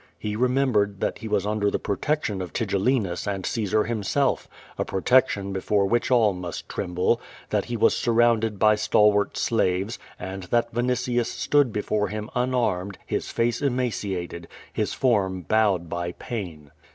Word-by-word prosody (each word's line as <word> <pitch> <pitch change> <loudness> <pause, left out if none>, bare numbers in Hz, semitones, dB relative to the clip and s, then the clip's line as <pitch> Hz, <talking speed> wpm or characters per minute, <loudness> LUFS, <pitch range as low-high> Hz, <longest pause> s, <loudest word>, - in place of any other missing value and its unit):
He 105 0 -4
remembered 120 -5 +1
that - - -2
lie 115 - -5
was 105 -2 +1
under 105 -1 +1
the - - 0
protection 105 -1 -1
of 90 - -6
Tigellinus 100 -3 0
and 95 -3 -2
Caesar 110 -2 +1
himself, 120 +5 0 0.3
a - - -1
protection 100 -2 +2
before 100 +1 +1
which 120 +4 +1
all 115 -5 +4
must 90 -2 -6
tremble; 90 +1 0 0.3
that - - +1
he 120 - -3
was - - +4
surrounded 115 -2 +2
by 110 +1 +5
stalwart 105 -1 +3
slaves, 100 0 0 0.2
and 95 +1 -5
that 120 +6 0
Yinitius 120 0 0
stood 145 -4 +2
before 105 0 0
him 105 +3 -5
unarmed, 120 -7 0
his - - -3
face 120 +2 0
emaciated, 105 -10 -2 0.3
his - - -1
form 95 -8 +1
bowed 100 -2 +2
by 85 +1 -3
pain. 85 - -6
105 Hz, 150 wpm, -25 LUFS, 95-120 Hz, 0.3 s, by